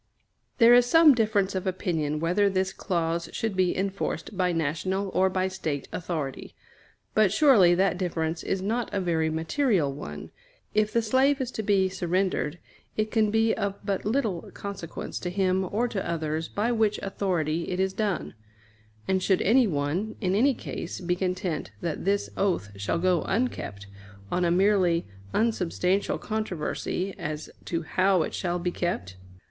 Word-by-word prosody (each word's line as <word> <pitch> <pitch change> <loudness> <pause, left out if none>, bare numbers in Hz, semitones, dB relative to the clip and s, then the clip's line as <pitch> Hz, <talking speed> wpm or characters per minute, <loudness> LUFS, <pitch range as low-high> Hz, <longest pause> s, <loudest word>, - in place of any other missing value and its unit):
There 235 0 +7
is 245 0 +6
some 320 +2 +7
difference 215 -5 +1
of 190 0 -3
opinion 160 -5 -1
whether 180 +5 +2
this 190 0 0
clause 170 -2 -1
should 225 -3 -2
be 185 -1 +1
enforced 195 +2 -3
by 180 -1 +1
national 170 +5 -1
or 190 0 +2
by 185 0 0
State 160 -7 -4
authority; 160 -6 -4 0.6
but 215 -3 +4
surely 215 - +6
that 185 0 +1
difference 165 -3 -2
is 190 -1 -2
not 230 +4 -1
a 200 - -1
very 165 -3 +1
material 160 - +1
one. 75 - -8 0.4
If 215 0 +2
the 230 +1 +1
slave 265 +5 +3
is 255 -2 -2
to 220 - -3
be 200 -3 +3
surrendered, 185 -3 -1 0.4
it 215 0 0
can 220 -2 +3
be 225 +1 +3
of 200 -1 -2
but 195 -1 -1
little 215 -6 -1
consequence 200 -5 -6
to 180 - -3
him 190 0 +1
or 235 +4 +1
to 195 -6 -3
others 160 -1 -2
by 220 +4 -1
which 220 -3 +2
authority 170 -5 -1
it 180 - -2
is 190 0 +1
done; 200 -3 -2 0.7
and 190 0 +1
should 190 0 +2
anyone, 195 - +2
in 185 -4 0
any 255 +6 +3
case, 170 - -6
be 180 0 0
content 180 - -2
that 165 0 -3
this 200 +1 +1
oath 180 - 0
shall 100 +8 -1
go 180 0 +2
unkept 190 - -2 0.5
on 180 0 +1
a - - +2
merely 180 -2 +3 0.3
unsubstantial 195 -3 +1
controversy 195 -2 -3
as 150 +1 -5
to 165 -1 -2
how 185 +2 +2
it - - -5
shall 175 -1 -1
be 175 0 -2
kept? 95 - -3
185 Hz, 160 wpm, -27 LUFS, 170-210 Hz, 0.7 s, There